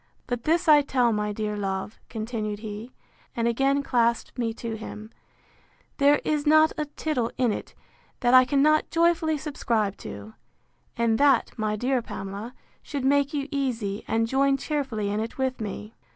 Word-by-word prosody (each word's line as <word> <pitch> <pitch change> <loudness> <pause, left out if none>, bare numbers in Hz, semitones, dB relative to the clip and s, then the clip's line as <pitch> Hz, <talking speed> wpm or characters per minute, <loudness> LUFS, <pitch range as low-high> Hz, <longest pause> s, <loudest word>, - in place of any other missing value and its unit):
But 245 -2 -4
this 335 +2 +2
I 300 -1 +8
tell 250 -4 +1
my 210 0 -1
dear 210 0 -3
love, 195 +1 -4
continued 215 -2 -4
he, 215 +2 -7 0.4
and 235 0 0
again 275 +4 +2
clasped 235 -3 +1
me 235 -2 -1
to 230 -1 -5
him, 215 0 -8 0.9
there 285 +1 +5
is 300 -1 0
not 310 +1 +6
a 305 - -2
tittle 290 -5 -2
in 250 -3 +2
it - - -6 0.5
that 245 -1 +3
I 255 0 +9
cannot 290 +4 +3
joyfully 330 -1 +2
subscribe 230 -9 -1
to: 100 +2 -9 0.6
And 230 -1 +2
that, 280 -4 +4
my 215 -2 -1
dear 250 +3 0
Pamela, 200 +3 -7 0.3
should 280 -3 -4
make 280 +1 +3
you 280 -1 -2
easy, 235 -8 -2
and 225 0 +1
join 275 +3 +2
cheerfully 270 -8 -2
in 205 - -1
it 225 +1 -4
with 260 -2 -1
me. 210 +1 -6
245 Hz, 165 wpm, -26 LUFS, 215-280 Hz, 0.9 s, I